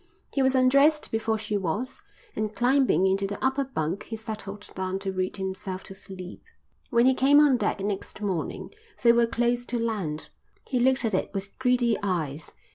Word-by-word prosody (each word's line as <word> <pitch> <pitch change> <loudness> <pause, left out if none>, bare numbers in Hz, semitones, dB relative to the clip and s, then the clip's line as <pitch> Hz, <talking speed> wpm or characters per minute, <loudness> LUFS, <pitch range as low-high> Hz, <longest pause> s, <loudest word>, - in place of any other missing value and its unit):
He 275 - +1
was 265 0 +3
undressed 275 +4 +4
before 220 0 0
she 215 -1 -2
was, 205 - -3 0.3
and 215 -1 -2
climbing 255 -4 +3
into 195 +1 +1
the 205 - -4
upper 265 +1 +2
bunk 185 - -3
he 225 - -5
settled 215 -2 -6
down 190 0 -2
to 195 0 -3
read 185 +1 -2
himself 190 0 -4
to - - -9
sleep. 190 -1 -9 0.5
When 235 0 +4
he 260 - +6
came 275 +3 +5
on 295 -3 +6
deck 240 - 0
next 200 -1 -4
morning 190 -6 -3 0.3
they 235 - +8
were 235 0 +3
close 240 +1 0
to 240 - -1
land. 205 -10 -3 0.4
He 255 - 0
looked 260 0 +3
at 220 - -1
it 185 - 0
with 195 0 -5
greedy 250 -3 +2
eyes. 160 -7 -2
220 Hz, 185 wpm, -26 LUFS, 190-250 Hz, 0.5 s, they